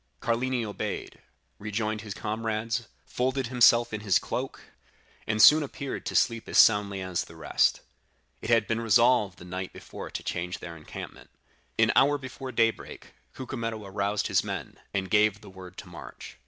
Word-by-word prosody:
"Carlini 120 +1 0
obeyed, 105 - -5 0.4
rejoined 105 +1 -2
his 105 -1 -7
comrades, 110 +1 -2 0.2
folded 130 0 -1
himself 120 -2 +5
in 105 - -3
his 100 -3 +3
cloak, - - -4 0.7
and 110 0 0
soon 150 +7 +9
appeared 140 -1 -5
to - - -4
sleep 115 -1 +1
as - - 0
soundly 100 -3 +5
as 95 -2 -2
the 80 - -14
rest. 80 - +1 0.6
It - - -6
had 115 -2 +4
been 115 +2 -1
resolved 115 -3 +3
the 90 - -12
night 90 +1 -5
before - - -9
to - - -6
change 90 +1 -3
their 85 -1 -8
encampment. 75 - -10 0.5
An - - +4
hour 145 +1 +5
before 130 -1 -7
daybreak, 115 -1 -1 0.2
Cucumetto 115 -4 -5
aroused 100 +1 -1
his - - +2
men, - - -6
and 95 -1 -2
gave 105 0 +3
the 105 - -13
word 90 -1 -12
to - - -9
march. 85 -8 -11
110 Hz, 165 wpm, -27 LUFS, 100-115 Hz, 0.7 s, soon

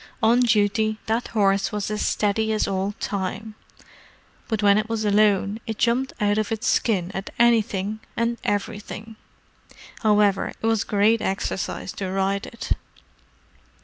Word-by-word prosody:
On 230 +2 +5
duty, 215 -2 +2
that 225 +2 -1
horse 195 -3 +1
was 210 0 -3
as 210 - -1
steady 220 +1 +1
as 215 - +1
old 195 +1 -2
Time: 200 +2 -3 0.9
but 220 -2 -2
when 200 0 +5
it 215 +1 -3
was 225 -1 -1
alone, 205 0 +3
it 220 -1 -3
jumped 250 +3 +1
out 205 0 +2
of 215 - -2
its 225 0 -2
skin 190 -6 +1
at 195 -1 -5
anything 215 -3 +2 0.2
and 235 +1 0
everything. 210 +2 -4 0.8
However, 210 -3 +2
it - - -5
was 225 -2 +2
great 215 +2 +2
exercise 190 -1 -3
to 190 -2 -5
ride 195 +1 -1
it!" 235 - -8
210 Hz, 145 wpm, -23 LUFS, 200-225 Hz, 0.9 s, On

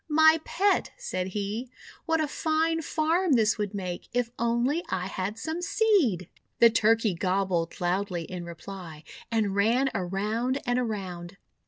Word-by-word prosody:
'My 315 +1 +6
Pet!' 400 +2 +1
said 485 - -3
he, 210 +5 -3 0.4
"what 325 0 +2
a 310 - +1
fine 320 +2 0
farm 325 +2 +1
this 220 -3 +3
would 205 -1 -2
make, 180 -3 -5
if 245 -1 0
only 235 +8 +1
I 180 - -1
had 195 +2 -3
some 320 +8 -4
seed!' 380 - +2 0.3
The 235 -1 +7
Turkey 225 -1 +3
gobbled 185 -1 -1
loudly 180 0 -1
in 180 +1 -6
reply, 170 -2 -9 0.3
and 215 -4 +1
ran 235 +7 +2
around 215 +7 -1
and 245 0 +1
around. 195 -6 -4
220 Hz, 145 wpm, -27 LUFS, 185-295 Hz, 0.4 s, The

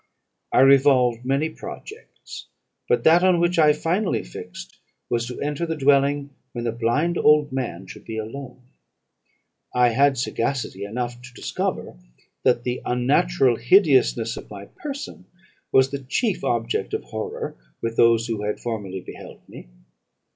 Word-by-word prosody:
I - - +4
revolved 130 -3 +4
many 140 +4 0
projects; 430 - -10 0.4
but - - +2
that 165 +2 +6
on 185 -2 +4
which 175 0 +1
I 150 -1 +6
finally 175 +6 -1
fixed - - -10 0.3
was, 120 -1 0
to 125 - -7
enter 150 +4 -2
the 160 - -2
dwelling 140 0 +2 0.2
when 120 - -4
the 115 - -1
blind 120 +10 0
old 150 -1 +4
man 120 -9 -4
should 95 - -12
be 110 - -6
alone. 125 +3 -7 1.1
I 125 -1 +5
had 135 +3 +3
sagacity 120 -5 -2
enough 120 +3 -4
to 130 0 -13
discover, - - -4 0.4
that 120 -2 +2
the 125 0 -3
unnatural 135 +1 +2
hideousness 125 - +3
of - - -10
my 100 -1 -9
person 285 - -8 0.5
was 130 0 +4
the 140 - -3
chief 150 - -1
object 430 -1 -1
of 435 - -4
horror 460 +1 -5 0.2
with 115 0 -3
those 115 -1 +4
who 115 -3 -3
had 105 0 -3
formerly 105 -5 -5
beheld - - -12
me. - - -12
130 Hz, 145 wpm, -23 LUFS, 120-155 Hz, 1.1 s, that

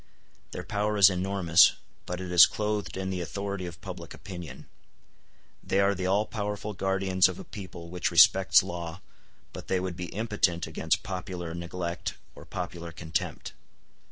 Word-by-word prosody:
Their - - -6
power 105 0 -1
is 100 -1 +8
enormous, 90 -2 +4 0.3
but 90 0 -4
it 90 -1 -5
is 90 -1 +9
clothed 105 -2 -3
in 95 0 -3
the 90 -1 -3
authority 100 +1 -4
of 85 -1 -9
public - - -8
opinion. 85 -9 -9 1.0
They 95 - +1
are 100 0 +4
the 95 -1 -3
all 100 +3 +2
powerful 105 -1 -4
guardians 95 -1 +2
of 95 - -6
a - - -8
people 90 -4 -9
which 90 0 -1
respects 90 +3 +6
law, 85 -1 -6 0.5
but - - -9
they 95 - +1
would 90 -1 -4
be 90 +1 -5
impotent 100 -6 0
against - - -1
popular 90 -3 -5
neglect 85 0 -4 0.2
or - - -13
popular 85 -1 -6
contempt. 80 0 -4
95 Hz, 155 wpm, -28 LUFS, 85-100 Hz, 1.0 s, is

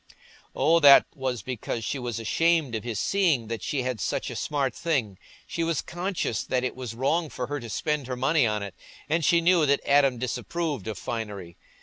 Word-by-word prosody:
Oh, 165 +1 +4
that 140 -3 +8
was 130 -5 -3
because 120 -2 -4
she 135 - -2
was 120 -2 -4
ashamed 160 +4 +1
of 110 - -3
his 115 -3 -3
seeing 160 - +1
that 115 -1 -4
she 140 -4 -2
had 125 -5 -3
such - - -2
a - - -6
smart 140 -4 -1
thing—she 140 - -3
was 165 -2 -1
conscious 175 - -2
that 125 -1 -1
it 130 - -2
was 125 -3 -6
wrong 155 +6 0
for 125 - -4
her 145 +3 -4
to 120 -3 -8
spend 150 +3 -2
her 130 - -3
money 135 +1 +2
on 105 -1 -1
it, 100 -3 -7 0.3
and 160 +2 0
she 170 +3 +4
knew 170 -3 +4
that 140 0 +3
Adam 140 -3 +4
disapproved 135 - -3
of 110 -3 -4
finery. 100 -6 -5
130 Hz, 200 wpm, -26 LUFS, 115-160 Hz, 0.3 s, that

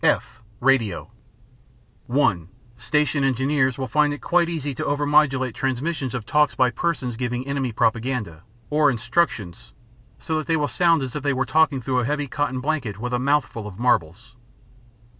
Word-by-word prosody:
(f) 125 -4 0 0.2
Radio 115 -8 +1 1.0
(1) 100 - +1 0.3
Station 150 +2 0
engineers 135 0 +1
will 130 -1 -3
find 150 +4 +2
it 145 - -3
quite 170 +2 +1
easy 145 -4 -3
to - - -4
overmodulate 145 -3 +2
transmissions 135 0 -2
of 115 -4 -4
talks 150 +4 +2
by 125 -1 +3
persons 130 -8 -2
giving 125 +1 -3
enemy 140 -3 -2
propaganda 110 -6 -1 0.3
or 150 -1 +4
instructions, 115 - -1 0.4
so 160 - -3
that 155 - -6
they 165 -1 +2
will 150 -1 0
sound 165 -4 +2
as 130 -2 -6
if 150 - -3
they 140 0 0
were 130 0 0
talking 155 0 +2
through 125 +1 -1
a 120 - 0
heavy 145 +2 -1
cotton 145 -3 -2
blanket 125 -8 -2
with 125 +3 -4
a 125 - +1
mouth 140 +2 +2
full 110 -2 -8
of 95 -3 -10
marbles. 115 -1 0
130 Hz, 170 wpm, -23 LUFS, 120-150 Hz, 1.0 s, or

